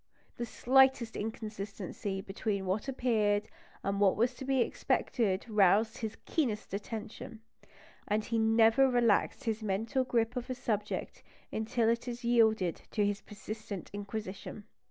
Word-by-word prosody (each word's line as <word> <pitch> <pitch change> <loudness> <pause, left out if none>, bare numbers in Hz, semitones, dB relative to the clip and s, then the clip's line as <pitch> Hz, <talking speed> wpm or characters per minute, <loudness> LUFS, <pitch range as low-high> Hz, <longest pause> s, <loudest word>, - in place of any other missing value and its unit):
The 240 - -3
slightest 260 -1 +3
inconsistency 205 -3 -4
between 195 0 -3
what 190 +7 -1
appeared 215 -5 +1 0.4
and 200 0 -1
what 195 -2 +5
was 240 +3 +2
to 265 - -8
be 265 0 +2
expected 205 -4 0
roused 215 +1 +3
his 220 -2 -4
keenest 235 -13 -1
attention; 220 +2 -6 0.7
and 210 +1 0
he 230 -1 0
never 225 +4 +5
relaxed 240 +1 +2
his 225 -3 -1
mental 220 +6 0
grip 235 -1 0
of 250 0 -4
a 255 - -2
subject 210 -4 -3 0.3
until 225 +1 0
it 230 +1 +1
had 240 -1 -5
yielded 220 -7 +3
to 210 -2 +1
his 205 -1 -1
persistent 210 -1 -7
inquisition. 205 0 -6
220 Hz, 135 wpm, -32 LUFS, 205-240 Hz, 0.7 s, what